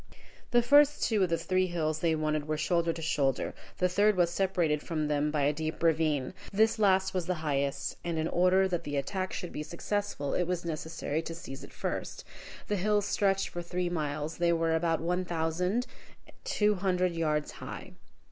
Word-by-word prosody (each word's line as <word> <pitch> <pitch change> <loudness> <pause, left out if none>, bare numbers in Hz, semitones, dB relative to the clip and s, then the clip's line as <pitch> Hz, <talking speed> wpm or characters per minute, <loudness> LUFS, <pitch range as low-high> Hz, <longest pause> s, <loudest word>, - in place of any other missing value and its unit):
The 240 0 +4
first 290 +3 +5
two 220 -4 +2
of 185 - +3
the 165 - +1
three 185 +1 +1
hills 155 -3 -1
they 165 -1 +2
wanted 155 -1 -1
were 155 0 -1
shoulder 170 +1 +1
to 165 0 -6
shoulder, 135 -4 0 0.2
the 180 - +3
third 205 +2 +3
was 175 -1 +3
separated 175 -5 +1
from 155 -2 -2
them 150 0 +1
by 150 -1 0
a 145 +2 +3
deep 160 +2 -4
ravine. 155 -4 +2 0.2
This 220 +2 +3
last 190 -2 +3
was 180 -2 -2
the 180 - 0
highest, 140 -1 -1
and 170 -1 -2
in 160 0 0
order 185 +2 +3
that 175 -3 -2
the 145 0 -3
attack 185 +7 -2
should 180 - -5
be - - -5
successful, 170 -2 -3
it 180 - +1
was 175 -1 -2
necessary 160 -1 -3
to 165 0 -6
seize 135 -5 -8
it - - -11
first. - - -4 0.4
The 205 - 0
hills 205 +2 +2
stretched 195 -2 +1
for 175 - -5
three 180 +1 -2
miles; 150 -2 -3
they 170 0 +3
were 165 -1 +1
about 165 -1 +1
one 180 +2 0
thousand 175 +7 -1 0.6
two 210 - +2
hundred 185 -2 0
yards 155 -2 0
high. - - -8
170 Hz, 195 wpm, -30 LUFS, 155-185 Hz, 0.6 s, first